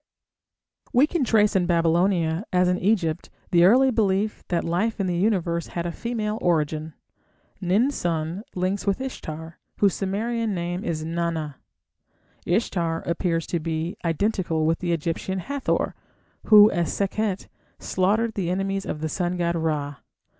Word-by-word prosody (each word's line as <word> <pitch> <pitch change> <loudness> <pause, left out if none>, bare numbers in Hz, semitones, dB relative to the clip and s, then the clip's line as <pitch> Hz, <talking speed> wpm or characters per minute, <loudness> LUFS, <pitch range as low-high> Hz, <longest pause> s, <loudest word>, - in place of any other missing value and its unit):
We 255 +4 +6
can 315 -1 -1
trace 215 -3 +3
in 180 -2 +2
Babylonia, 170 0 +2
as 180 -1 +3
in 180 0 +1
Egypt, 180 -5 0 0.2
the 175 -1 +6
early 260 +7 +5
belief 210 -2 0
that 170 -2 0
life 200 +7 -1
in 195 - +1
the 180 -1 -1
Universe 175 -3 0
had 170 -1 -4
a 170 - -2
female 220 +1 -3
origin. 155 - 0 0.7
Nin 200 +9 +2
sun 170 - -2
links 185 +3 -1
with 195 - +1
Ishtar, 160 -11 -7 0.2
whose 200 -3 +3
Sumerian 220 +2 -1
name 175 +1 -3
is 155 -2 -3
Nana. 165 -4 -2 0.9
Ishtar 170 -4 0
appears 170 -1 -1
to 170 - -2
be 160 +1 -3
identical 170 -2 0
with 165 +1 +1
the 175 -1 -2
Egyptian 170 +3 -2
Hathor, 275 +8 -1 0.5
who, 210 -1 +8
as 170 -4 0
Sekhet, 200 0 -1 0.3
slaughtered 215 +5 0
the 185 -5 -2
enemies 195 +1 -1
of 150 - -4
the 160 - -1
sun 175 +2 -2
god 170 -1 0
Ra. 150 -3 -2
180 Hz, 145 wpm, -24 LUFS, 165-205 Hz, 0.9 s, who